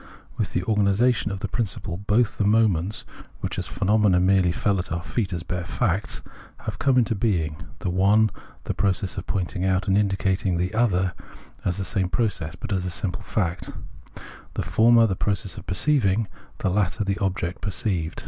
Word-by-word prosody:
With - - -2
the 90 - +1
origina 105 +4 +3
tion 105 -2 -3
of 95 -1 -5
the 100 - -1
principle, 95 -5 -3
both 105 +4 +1
the - - +3
moments, 105 -2 +2 0.4
which - - -3
as - - -1
phenomena 105 -2 +3
merely 95 -1 +4
fell 100 +2 0
at 90 - -5
our 85 0 -2
feet 105 -1 -2
as 85 -3 -3
bare 90 0 -3
facts, 95 +3 -1 0.4
have - - -5
come 135 -2 +3
into 115 -2 +3
being: 90 -8 0 0.2
the 90 - -2
one, 100 +4 +4 0.3
the - - -2
process 95 0 0
of - - -5
pointing 90 -1 -2
out 95 +2 +1
and 95 - +3
indicating, 95 -2 +1
the 90 +4 -1
other 95 -6 +2 0.5
the 95 +2 -1
same 95 -4 0
process, 90 -8 -1
but 100 - -4
as 95 -2 0
a 90 - -2
simple 95 +3 -2
fact 95 -5 -2 0.5
— - - -14
the - - -1
former 115 +1 +5
the 95 -4 0
process 100 -2 -2
of - - -10
perceiving, 105 - +2 0.3
the - - 0
latter 105 +2 +1
the 100 0 -1
object 95 -3 -2
perceived. 95 -5 -1
95 Hz, 185 wpm, -24 LUFS, 90-105 Hz, 0.5 s, former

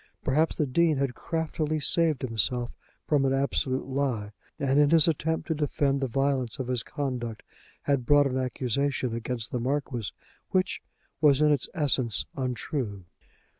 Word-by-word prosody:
Perhaps 155 +4 +2
the 150 - +1
Dean 155 +3 +2
had 135 -2 0
craftily 155 0 -2
saved 155 -1 +2
himself 120 +1 0 0.3
from 145 -3 +2
an 135 0 +2
absolute 135 -1 0
lie, 130 -6 -1 0.3
and 140 -2 +2
in 145 -1 +5
his 165 0 +5
attempt 160 0 0
to 165 - +1
defend 145 -2 0
the 135 - +1
violence 135 -1 0
of 130 -3 -4
his 125 -2 +1
conduct 125 -6 -4 0.4
had 140 -3 +1
brought 145 +3 +5
an 130 -1 0
accusation 130 0 -1
against 115 -1 -3
the 125 - -1
Marquis, 125 -4 -2 0.4
which 185 -1 0 0.4
was 145 -3 +5
in 150 0 +4
its 145 -3 +1
essence, 135 - +1
untrue. 125 - -3
135 Hz, 155 wpm, -27 LUFS, 125-150 Hz, 0.4 s, in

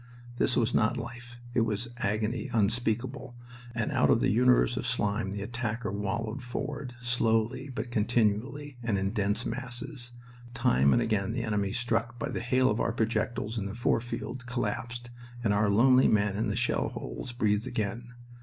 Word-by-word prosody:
This 125 - +2
was 120 0 +2
not 110 +3 +3
life; 120 0 -8
it 120 - +3
was 115 +1 -1
agony 110 +1 -1
unspeakable. 120 +3 0 0.4
And 115 +5 -1
out 130 -3 +3
of 120 - +5
the - - +2
universe 125 - +4
of - - -2
slime 105 0 0
the 100 0 -4
attacker 115 -1 -3
wallowed 110 +5 -2
forward, 130 +1 -5
slowly 120 +2 +1
but 120 -1 -5
continually, 120 +5 0
and 115 -4 0
in 95 +1 0
dense 100 -1 0
masses. 120 +1 -5 0.4
Time 70 - +4
and 120 - +4
again 110 -1 0
the 120 - -2
enemy, 105 -3 0
struck 115 0 -1
by - - -3
the - - -3
hail 130 +2 +3
of 105 - -1
our 115 - +1
projectiles 110 0 -1
in 100 - -3
the 100 - -6
fore 120 -1 +2
field, 125 +1 -5
collapsed, 120 0 -3 0.3
and 105 -3 +3
our 105 0 +3
lonely 125 +5 +6
men 105 -2 +2
in 110 +2 0
the 105 - -1
shell 120 +1 +1
holes - - -6
breathed 110 -3 +1
again. 120 +2 -3
115 Hz, 175 wpm, -29 LUFS, 105-125 Hz, 0.4 s, lonely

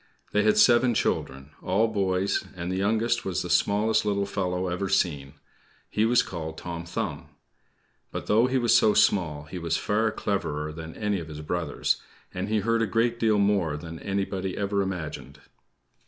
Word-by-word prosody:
They 105 - +3
had 105 0 +3
seven 120 0 +5
children 65 -7 -1
all 100 +5 +2
boys; 95 -3 0
and 90 0 -4
the - - -1
youngest 115 +4 +1
was 95 -4 -2
the 90 - -4
smallest 105 +5 +2
little 100 -1 0
fellow 95 -2 -2
ever 90 +2 -2
seen. 75 -7 0 0.6
He 105 - +2
was 120 +1 +4
called 80 -3 -6
Tom 85 -1 -6
Thumb. 85 - -4 0.8
But - - -5
though 115 +4 +4
he 130 +1 +1
was 120 -2 +3
so 105 - +5
small, 75 -7 +2
he 80 +5 -7
was 85 -1 0
far 110 +2 +1
cleverer 80 -9 -2
than 80 0 -8
any 105 -3 -1
of 80 - -7
his 75 -1 -8
brothers, 80 -1 -1 0.3
and 95 +3 -3
he 110 -1 +1
heard 115 +2 +1
a 115 - +1
great 115 +2 +1
deal 110 -2 +3
more 100 -7 +2
than 80 +1 -8
anybody 95 -1 -3
ever 100 0 0
imagined. 75 -7 -5
95 Hz, 175 wpm, -26 LUFS, 85-105 Hz, 0.8 s, seven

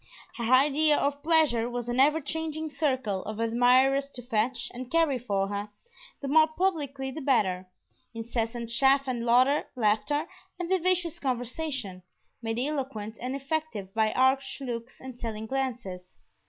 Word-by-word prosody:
Her 235 0 -1
idea 295 +3 +5
of 285 0 -1
pleasure 305 -7 +3
was 240 -1 -4
an 240 +1 -1
ever 295 +4 +5
changing 315 +1 -4
circle 260 -10 -1
of 215 +1 -5
admirers 250 +4 +3
to 245 - -7
fetch 240 +1 -1
and 250 0 -7
carry 320 -5 +2
for 200 -4 -1
her, 205 +1 -4 0.5
the - - -2
more 310 +3 +6
publicly 300 -6 -2
the 310 - -6
better; 190 -9 +1 0.4
incessant 230 0 -3
chaff 270 +3 +3
and 245 -2 -2
laughter 250 +1 +2 0.3
and 355 -1 -4
vivacious 365 -2 +1
conversation, 250 - -3 0.4
made 225 -1 -3
eloquent 250 -6 -3
and 255 +2 -3
effective 275 -9 -3
by 220 -1 +2
arch 265 +1 +2
looks 240 -2 -6
and 260 -2 -10
telling 220 -2 -4
glances. 225 -8 -4
255 Hz, 140 wpm, -28 LUFS, 230-285 Hz, 0.5 s, more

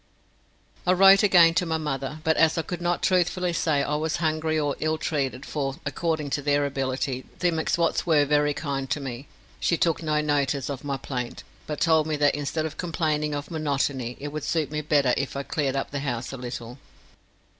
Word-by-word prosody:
I 180 - +5
wrote 195 +1 +7
again 175 -5 +6
to 180 - +1
my 160 0 0
mother, 150 -1 -4
but 160 0 +2
as 165 0 +3
I 165 - 0
could 175 0 -5
not 175 0 0
truthfully 180 -1 +1
say 155 -3 +1
I 145 - -2
was 155 0 -1
hungry 155 0 0
or 145 -2 0
ill 155 0 0
treated, 140 -4 -2
for, 135 -3 -3
according 160 -4 -2
to 145 - 0
their 145 0 +2
ability, 135 -1 -2
the 175 -1 +1
M'Swats 165 +1 0
were 155 -4 +3
very 150 0 +2
kind 135 -3 -3
to - - 0
me, 135 -1 -6 0.3
she 170 - +1
took 165 -1 +1
no 155 -1 +1
notice 145 -2 0
of 135 0 -6
my 140 -1 -2
plaint, 125 -3 -5 0.2
but 150 - -4
told 160 -2 +3
me 155 - 0
that 145 -1 +3
instead 145 +2 -2
of 160 - -6
complaining 155 -3 -1
of 145 +2 -6
monotony, 140 -5 -1
it 145 - -5
would 150 0 -5
suit 160 -3 -1
me 150 0 -2
better 145 -4 +2
if 140 0 -2
I 140 - -2
cleared 140 -2 -1
up 135 - -2
the 140 - -2
house 125 -3 -3
a - - -5
little. 120 0 -7
150 Hz, 205 wpm, -25 LUFS, 140-160 Hz, 0.3 s, wrote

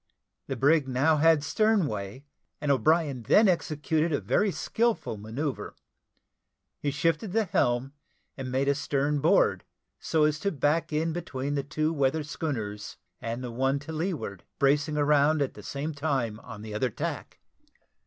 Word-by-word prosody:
The 135 - -2
brig 145 +4 +3
had - - -8
now 155 +4 +4
stern 215 +5 +2
way, 105 +3 -5 0.3
and 150 - 0
O'Brien 150 -1 +2
then 205 - +5
executed 160 -2 0
a 145 - +1
very 125 - +1
skilful 220 - -1
manoeuvre: 125 +7 -4 1.0
he 145 - -1
shifted 165 +7 0
the 225 0 +3
helm, 130 - 0 0.4
and 130 -2 -5
made 135 +2 0
a 140 - +4
stern 145 +1 0
board, - - +3 0.4
so 160 -1 +1
as 150 0 +2
to 200 +4 0
back 150 +2 0
in 160 +2 0
between 140 -5 -4
the 140 - 0
two 155 +3 -1
weather 140 +1 +1
schooners 110 -9 -4 0.2
and 115 +2 -4
the 125 - -5
one 135 +3 +1
to 145 +3 -7
leeward, 155 - -3
bracing 145 +2 +2
round 150 +1 +3
at 140 -2 -1
the 105 - -11
same 140 +8 -4
time 135 -7 -1
on 115 -3 -10
the 110 -1 -7
other 125 +4 0
tack. - - -5
145 Hz, 160 wpm, -28 LUFS, 130-160 Hz, 1.0 s, then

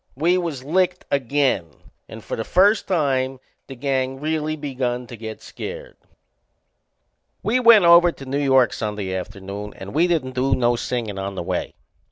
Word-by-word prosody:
We 165 +7 +2
was 165 -8 -3
licked 180 +4 0
again 135 - +1 0.4
and - - -10
for - - -4
the 115 - -3
first 200 - +3
time 135 -6 0 0.3
the 135 - -8
gang 130 0 -1
really 155 +1 -1
begun 130 -4 -3
to 120 - -10
get 110 -1 -8
scared. - - -8 1.5
We 240 +4 +2
went 230 -6 +7
over 170 0 +7
to 135 - -11
New 135 +2 -2
York 130 -3 +3
Sunday 105 -3 -3
afternoon 100 +2 -6
and 95 +1 -9
we 165 +5 +3
didn't 155 -7 -1
do 130 +2 +1
no 120 -1 +2
singin' 115 -5 -3
on 95 0 -4
the 90 - -4
way. - - -3
135 Hz, 165 wpm, -22 LUFS, 115-165 Hz, 1.5 s, went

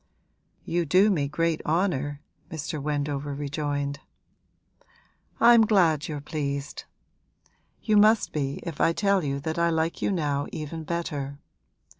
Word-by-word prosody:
'You 175 +1 0
do 185 +7 +4
me 145 -7 0
great 165 +2 0
honour,' 145 -4 0 0.3
Mr. 155 -1 -5
Wendover 145 -1 -2
rejoined. 145 0 -3 1.4
'I'm 235 -2 +7
glad 165 -8 +3
you're 150 -2 -4
pleased! 140 -1 -4 1.0
You 215 -2 +3
must 215 +1 +4
be 140 -2 -2
if 165 -4 -5
I 165 - +4
tell 200 -1 +2
you 140 -1 -2
that 160 +2 -3
I 170 0 +3
like 160 0 -1
you - - +1
now 145 -6 -1
even 155 +1 -6
better. 145 -4 -3
155 Hz, 130 wpm, -26 LUFS, 145-170 Hz, 1.4 s, I'm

